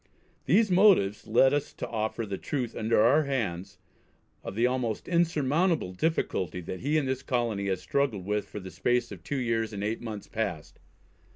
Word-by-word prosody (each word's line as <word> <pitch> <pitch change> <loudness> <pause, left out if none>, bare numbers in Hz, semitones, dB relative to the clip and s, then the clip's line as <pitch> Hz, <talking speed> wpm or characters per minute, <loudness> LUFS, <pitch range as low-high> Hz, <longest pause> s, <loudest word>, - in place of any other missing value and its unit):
These 215 -2 +3
motives 180 - +4
led 130 +5 +4
us 145 0 -1
to - - -5
offer 110 0 -2
the 100 -2 -5
truth 130 -6 -3
under 110 0 +1
our 145 +6 +4
hands, 100 -9 -3 0.7
of 95 - -6
the 115 +3 +2
almost 125 -3 -1
insurmountable 165 - +1
difficulty, 90 - -1
that 90 +2 -6
he 150 +4 +1
and 145 -3 0
this 130 0 -1
colony 115 -6 -1
has 95 -2 -1
struggled 110 -1 -1
with 105 +1 -1
for 105 - -6
the 95 -1 -9
space 120 +8 0
of 90 -5 -9
two 140 - -3
years 115 -3 -1
and 100 0 -4
eight 110 +2 -2
months 110 -4 -6
past." 100 -9 -4
115 Hz, 180 wpm, -28 LUFS, 100-140 Hz, 0.7 s, motives